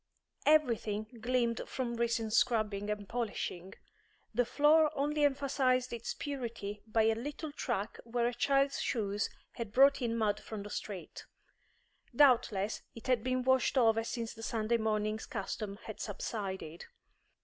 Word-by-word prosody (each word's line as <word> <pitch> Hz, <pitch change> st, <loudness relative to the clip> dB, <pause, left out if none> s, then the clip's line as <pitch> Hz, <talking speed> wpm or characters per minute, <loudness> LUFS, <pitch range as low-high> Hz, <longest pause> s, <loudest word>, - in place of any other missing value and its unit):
Every 300 Hz, -6 st, +5 dB
thing 215 Hz, +3 st, -5 dB
gleamed 235 Hz, -1 st, +1 dB
from 245 Hz, -3 st, -3 dB
recent 230 Hz, -2 st, 0 dB
scrubbing 215 Hz, -4 st, +2 dB
and 210 Hz, -1 st, -3 dB
polishing; 200 Hz, -6 st, -4 dB, 0.6 s
the 245 Hz, +2 st, +2 dB
floor 305 Hz, +4 st, +5 dB
only 295 Hz, +2 st, 0 dB
emphasised 265 Hz, -3 st, +2 dB
its 235 Hz, -1 st, -4 dB
purity 230 Hz, -7 st, -5 dB
by 220 Hz, 0 st, +2 dB
a 225 Hz, 0 st, +4 dB
little 290 Hz, +6 st, -5 dB
track 235 Hz, -8 st, -3 dB
where 235 Hz, 0 st, -1 dB
a 240 Hz, -, +1 dB
child's 275 Hz, +2 st, +2 dB
shoes 205 Hz, -3 st, -1 dB, 0.2 s
had 230 Hz, -3 st, -6 dB
brought 275 Hz, +4 st, +5 dB
in 230 Hz, -1 st, 0 dB
mud 210 Hz, -2 st, +1 dB
from 215 Hz, -2 st, -7 dB
the 205 Hz, -, -8 dB
street; 190 Hz, -6 st, -6 dB, 0.9 s
doubtless 230 Hz, -7 st, +3 dB
it 230 Hz, -, -11 dB
had 250 Hz, -4 st, +2 dB
been 255 Hz, 0 st, 0 dB
washed 260 Hz, +1 st, +3 dB
over 225 Hz, -2 st, +4 dB
since 230 Hz, 0 st, -4 dB
the 225 Hz, -, -11 dB
Sunday 225 Hz, 0 st, 0 dB
morning's 215 Hz, -1 st, -1 dB
custom 200 Hz, 0 st, -4 dB
had 220 Hz, -, -7 dB
subsided. 190 Hz, -5 st, -5 dB
230 Hz, 145 wpm, -33 LUFS, 215-255 Hz, 0.9 s, Every